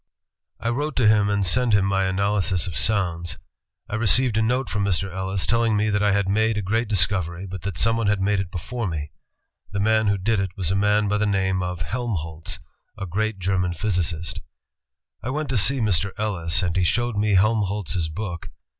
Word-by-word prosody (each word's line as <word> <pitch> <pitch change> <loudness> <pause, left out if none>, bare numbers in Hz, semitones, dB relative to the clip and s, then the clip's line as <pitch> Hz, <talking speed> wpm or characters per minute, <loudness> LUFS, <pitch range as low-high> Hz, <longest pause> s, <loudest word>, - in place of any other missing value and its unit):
*' - - -55
I 115 - -2
wrote 145 +5 -2
to 120 -4 +3
him 105 -1 +4
and 100 -1 +1
sent 115 +4 +3
him 100 -1 +3
my 95 0 +1
analysis 95 -1 +1
of 90 -4 -5
sounds.... 90 -6 0 0.5
I - - -9
received 115 +2 +3
a 110 - +2
note 125 +4 0
from 105 -2 -1
Mr. 95 -1 -1
Ellis 95 -1 -2
telling 115 0 +2
me 105 +1 +1
that 105 0 +1
I 105 0 +3
had 100 -1 +1
made 110 +2 +1
a 105 - -2
great 110 +5 0
discovery, 90 -2 +1
but 95 -1 -7
that 95 -1 -5
someone 115 -1 +2
had 105 -1 +2
made 100 +1 +1
it 95 -2 -3
before 115 +6 -4
me. 75 -3 -4 0.6
The 100 - -3
man 110 +1 +2
who 100 0 +2
did 105 +2 0
it 95 -2 -3
was 90 -3 -1
a - - +1
man 105 +1 +2
by 105 +1 0
the 105 - +1
name 95 -2 0
of 90 -2 -3
Helmholtz, 85 -8 -4 0.4
a 100 - -4
great 105 +4 -2
German 90 -1 0
physicist. 85 -3 -1 0.8
''I 120 - -3
went 150 0 -3
to 130 - -1
see 130 +7 +3
Mr. 100 -3 +1
Ellis, 95 -4 0
and 85 -1 -1
he 95 - +2
showed 120 +5 0
me 105 0 +2
Helmholtz's 100 -4 +1
book. 85 +1 -6
100 Hz, 205 wpm, -23 LUFS, 90-110 Hz, 0.8 s, him